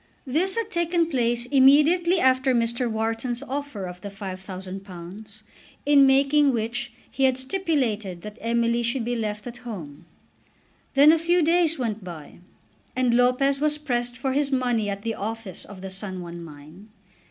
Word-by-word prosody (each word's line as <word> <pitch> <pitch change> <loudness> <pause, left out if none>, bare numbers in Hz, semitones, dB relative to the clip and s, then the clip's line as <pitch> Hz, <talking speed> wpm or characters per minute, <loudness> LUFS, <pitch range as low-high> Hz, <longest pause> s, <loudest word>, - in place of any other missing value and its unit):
This 330 +9 +1
had 450 -1 -2
taken 340 -1 +1
place 240 -2 +1
immediately 300 +7 +5
after 260 -2 +3
Mr. 235 +1 0
Wharton's 225 +3 -2
offer 280 -7 -5
of 180 0 -8
the 200 - -6
£5000, 190 +1 -8 0.4
in 280 -1 +6
making 275 +1 +4
which 235 +2 -2 0.2
he 270 0 +1
had 260 -1 +2
stipulated 260 - -1
that 210 +1 -9
Emily 235 +1 +1
should 235 0 -1
be 245 +1 -1
left 210 -2 -3
at 245 -1 -7
home. 175 -13 -9 0.9
Then 285 +3 +8
a 325 - +3
few 345 +1 +2
days 330 0 +3
went 225 -5 -3
by, 170 -4 -10 0.6
and 250 -2 +2
Lopez 250 +3 +3
was 300 0 +2
pressed 245 -4 -2
for 265 0 -2
his 285 0 +1
money 245 -5 +1
at 200 0 -5
the 225 -1 -1
office 220 -3 -5
of 195 -3 -11
the 190 0 -7
San 190 -1 -6
Juan 170 0 -8
mine. 155 +5 -13
240 Hz, 160 wpm, -24 LUFS, 205-275 Hz, 0.9 s, Then